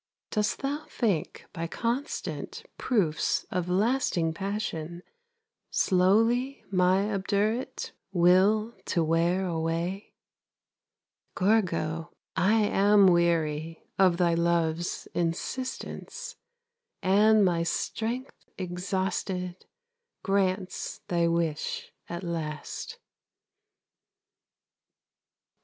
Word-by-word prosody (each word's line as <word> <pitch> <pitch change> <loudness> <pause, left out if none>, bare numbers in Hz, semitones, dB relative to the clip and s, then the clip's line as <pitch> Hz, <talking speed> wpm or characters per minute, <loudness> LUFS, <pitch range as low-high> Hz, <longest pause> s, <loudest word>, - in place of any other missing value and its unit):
Dost 210 +4 0
thou 290 +3 -2
think 200 - -1
by 165 0 -3
constant 240 - -3
Proofs 190 -11 +1
of 180 -1 -1
lasting 185 -5 +1
passion, 175 -3 -4 0.7
Slowly 225 +9 +2
my 190 +3 +3
obdurate 210 +6 -1 0.2
Will 195 +5 +4
to 170 - +1
wear 170 +4 +2
away? 170 +3 -2 1.2
Gorgo, 165 -6 +1 0.2
I 210 +6 +3
am 205 0 +5
weary 165 -3 +2 0.2
Of 185 -3 +5
thy 175 -2 +3
love's 170 0 0
insistence, 255 - -4 0.7
And 210 +2 +5
my 175 -2 +2
strength 230 +9 -3
exhausted 185 0 -3 0.6
Grants 190 -1 -1
thy 170 -1 +2
wish 165 -2 -1 0.2
at 170 +2 -5
last. 160 -3 -5
185 Hz, 75 wpm, -28 LUFS, 170-210 Hz, 1.2 s, am